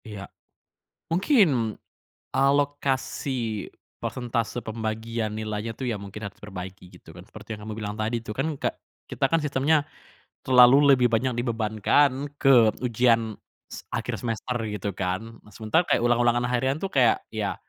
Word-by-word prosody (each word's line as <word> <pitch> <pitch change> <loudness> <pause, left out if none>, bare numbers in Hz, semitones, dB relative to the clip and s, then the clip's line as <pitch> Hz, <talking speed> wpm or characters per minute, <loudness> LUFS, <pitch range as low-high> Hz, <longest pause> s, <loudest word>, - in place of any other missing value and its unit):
Iya. 105 -3 -7 0.8
Mungkin 165 - +2 0.6
alokasi 135 -5 0 0.3
persentase 120 -1 -3
pembagian 110 0 -3
nilainya 110 +1 -4
tuh, 130 - -4
ya 115 - -1
mungkin 100 +2 -8
harus 100 0 -7
diperbaiki 95 -2 -8 0.2
gitu 80 - -14
kan. 90 - -11
Seperti 110 +2 -9
yang 105 - -11
kamu 110 0 -5
bilang 105 -1 -4
tadi 110 +2 -1
tuh 105 - -5
kan - - 0
ke - - +1 0.4
kita - - 0
kan 165 +4 +1
sistemnya 150 +1 +2 0.6
terlalu 130 +3 +7
lebih 125 -2 +4
banyak 120 +3 +1
dibebankan 120 +4 +1
ke 125 -6 +5
ujian 115 -2 +2 0.3
se - - -9
akhir - - -3
semester 120 +1 -3
gitu 105 -1 -3
kan. 95 +5 -4
Nah, 105 - -19
sementara 110 - +1
kayak - - +2
ulang-ulangan 120 0 +3
harian 130 +2 +1
tuh 195 - -2
kayak, 125 -7 +3
ya 105 -3 -2
115 Hz, 145 wpm, -25 LUFS, 110-130 Hz, 0.8 s, terlalu